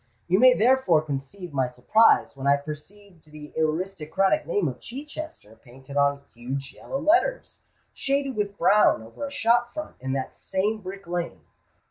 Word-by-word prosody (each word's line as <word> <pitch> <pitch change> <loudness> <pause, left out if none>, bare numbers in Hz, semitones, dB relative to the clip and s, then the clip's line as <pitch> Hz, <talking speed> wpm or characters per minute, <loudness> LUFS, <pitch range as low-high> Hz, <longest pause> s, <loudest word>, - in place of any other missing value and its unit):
"You 185 +3 +3
may 255 +1 +7
therefore 225 -10 +3
conceive 155 +5 -6
my 130 -2 +1
surprise 140 - +3
when 135 0 -4
I 140 0 +5
perceived 160 +4 -11
the 150 0 -11
aristocratic 160 +1 0
name 175 0 +1
of 125 -2 -5
Chichester 280 - -8
painted 130 +3 -13
in 140 0 +2
huge 135 +3 -6
yellow 270 - -5
letters, 355 - +1 0.3
shaded 275 -1 -1
with 205 -1 -2
brown, 205 - +4
over 115 - -7
a - - -9
shop 240 0 +1
front 305 0 -6
in 130 +1 -3
that 135 -1 -3
same 205 +3 -2
Brick 195 0 -8
Lane." 170 - -4
180 Hz, 155 wpm, -25 LUFS, 140-225 Hz, 0.3 s, may